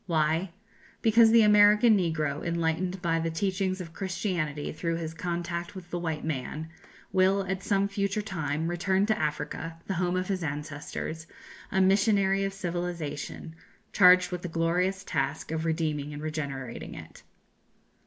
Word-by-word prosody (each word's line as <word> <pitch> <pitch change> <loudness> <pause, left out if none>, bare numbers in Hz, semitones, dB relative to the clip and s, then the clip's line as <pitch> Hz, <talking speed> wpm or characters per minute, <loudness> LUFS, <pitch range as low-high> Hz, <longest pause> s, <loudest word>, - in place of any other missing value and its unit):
Why? 160 +2 +1 0.5
Because 225 0 +6
the 230 0 +6
American 210 +2 +6
negro, 155 -6 -1
enlightened 170 +2 -1
by 165 -1 +1
the 165 0 -1
teachings 185 +2 -1
of 165 -3 -8
Christianity 175 -6 -2
through 165 +1 -2
his 165 -1 -4
contact 170 +1 -4
with 180 -2 -10
the 175 - -2
white 160 -3 -3
man, 155 +1 -4 0.4
will, 190 +1 +3
at 190 0 -2
some 200 0 +1
future 200 +1 -1
time, 160 -6 -2
return 190 +3 +1
to 220 0 0
Africa, 155 +2 -3
the 195 - -2
home 180 0 +1
of 185 0 -2
his 190 -2 -1
ancestors, 150 +2 -5 0.4
a 190 - +2
missionary 195 0 +3
of 195 - -1
civilization, 175 -5 -4 0.4
charged 180 -1 +6
with 180 -1 -3
the 180 - -4
glorious 175 +4 0
task 140 -2 -2
of 160 0 -2
redeeming 155 -3 -1
and 150 - -7
regenerating 140 -5 -5
it. - - -11
175 Hz, 150 wpm, -28 LUFS, 160-190 Hz, 0.5 s, Because